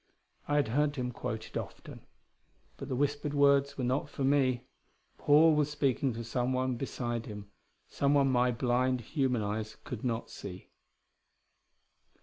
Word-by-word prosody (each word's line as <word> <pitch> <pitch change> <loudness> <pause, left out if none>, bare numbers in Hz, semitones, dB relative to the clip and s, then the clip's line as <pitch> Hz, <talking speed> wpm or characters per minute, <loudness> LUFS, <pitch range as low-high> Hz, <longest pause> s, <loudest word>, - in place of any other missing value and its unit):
I 145 - +1
had 145 -6 +2
heard 145 +4 +1
him 125 -2 -2
quote 110 -2 -5
it - - -18
often. - - -7 0.7
But 135 - -7
the 130 - -1
whispered 145 +2 -1
words 140 0 +4
were 130 - -2
not 130 +3 0
for 140 - -4
me. 130 -2 +2 0.5
Paul 155 +2 +6
was 150 -1 +2
speaking 140 -2 0
to 115 +1 -5
someone 130 +2 0
beside 120 -2 -3
him 105 -2 -8 0.4
someone 140 -1 +2
my 125 0 +3
blind, 125 +1 +1
human 125 -2 0
eyes 105 +1 -4
could 125 -5 -6
not 120 -2 -2
see.... 95 -2 -9
130 Hz, 145 wpm, -31 LUFS, 120-140 Hz, 0.7 s, Paul